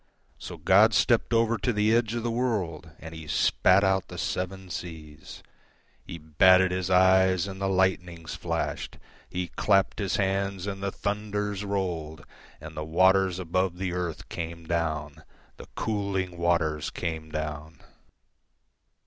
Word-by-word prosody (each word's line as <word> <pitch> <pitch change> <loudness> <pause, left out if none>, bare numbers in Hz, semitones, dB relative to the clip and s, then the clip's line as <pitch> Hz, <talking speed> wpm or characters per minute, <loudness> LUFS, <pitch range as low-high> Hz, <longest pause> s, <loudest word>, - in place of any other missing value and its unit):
So - - -8
God 105 +3 +5
stepped 120 -2 +2
over 115 0 +2
to 125 - 0
the 105 0 +2
edge 120 -1 +1
of 120 - -3
the 120 - -1
worldAnd 85 -10 -3
He 80 -1 -9
spat 95 +5 +3
out 95 0 +1
the - - -9
seven 95 0 -4
seas; 80 -3 -8 0.6
He 85 - -8
batted 90 +4 +4
His 90 0 -2
eyes, 95 0 +4
and 95 -1 -7
the 95 - 0
lightnings 90 -3 0
flashed; - - -3 0.3
He 90 -1 -3
clapped 100 +3 +1
His 100 -3 -1
hands, 95 -1 -1
and 100 -1 -5
the 100 0 -2
thunders 105 0 -3
rolled; 85 -7 -3 0.3
And 80 +1 -10
the 75 - -4
waters 95 +3 +3
above 90 0 -1
the 90 -1 -3
earth 90 -3 -4
came 85 0 -6
down, 80 -3 -2 0.4
The - - -11
cooling 100 -4 -2
waters 85 -3 0
came 80 -2 -5
down. 75 0 -5
95 Hz, 140 wpm, -27 LUFS, 80-100 Hz, 0.6 s, God